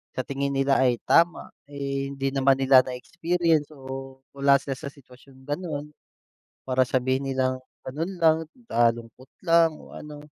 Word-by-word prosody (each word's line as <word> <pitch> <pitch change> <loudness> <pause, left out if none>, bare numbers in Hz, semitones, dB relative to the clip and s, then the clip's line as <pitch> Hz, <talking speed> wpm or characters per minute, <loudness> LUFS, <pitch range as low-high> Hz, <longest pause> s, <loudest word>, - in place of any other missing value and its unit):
sa - - 0
tingin 140 +1 -3
nila 135 0 +2
ay 125 -2 +3
tama, 170 0 +2 0.2
eh, 140 -1 -3
hindi 135 0 -2
naman 135 0 +3
nila 135 -1 +7
na-experience 165 +4 0
o 135 0 -8
wala 140 0 +3
siya 135 -1 -5
sa 150 - -6
sitwasyong 130 -1 -16
gano'n. 150 0 -5 0.7
Para 130 0 +2
sabihin 130 +1 0
nilang 130 -1 0 0.2
ganun 155 +8 -4
lang, 160 -1 +5 0.3
nalungkot 115 +2 0 0.2
lang 165 -2 +4
o - - -15
ano 150 -1 -10
135 Hz, 145 wpm, -25 LUFS, 130-150 Hz, 0.7 s, nila